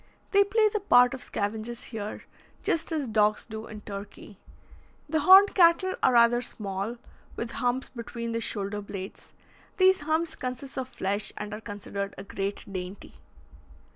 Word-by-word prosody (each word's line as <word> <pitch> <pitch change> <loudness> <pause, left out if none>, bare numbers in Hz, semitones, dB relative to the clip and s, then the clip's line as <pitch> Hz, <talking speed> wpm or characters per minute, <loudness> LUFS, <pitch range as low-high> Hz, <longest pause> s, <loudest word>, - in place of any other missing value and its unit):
They 400 0 +6
play 430 +2 +3
the 425 0 -1
part 250 -11 +5
of 260 - -6
scavengers 220 +3 -4
here, 210 -1 -5 0.4
just 330 0 0
as 305 -5 -1
dogs 215 -1 +2
do 220 0 -7
in 215 -1 -9
Turkey. 205 0 -9 0.7
The 315 +1 +1
horned 380 +6 +8
cattle 365 +1 +5
are 255 - +4
rather 235 0 +5
small, 205 0 -4 0.4
with 235 0 -4
humps 250 +2 -1
between 235 -1 -6
the 230 0 -2
shoulder 205 -1 -3
blades; 195 -1 -8 0.4
these 375 0 +5
humps 315 +2 -1
consist 255 +2 -5
of 260 -1 -4
flesh 200 0 -2
and 210 0 -5
are 210 - -6
considered 200 -2 -5
a - - -7
great 200 0 -4
dainty. 185 +1 -6
230 Hz, 155 wpm, -27 LUFS, 205-290 Hz, 0.7 s, horned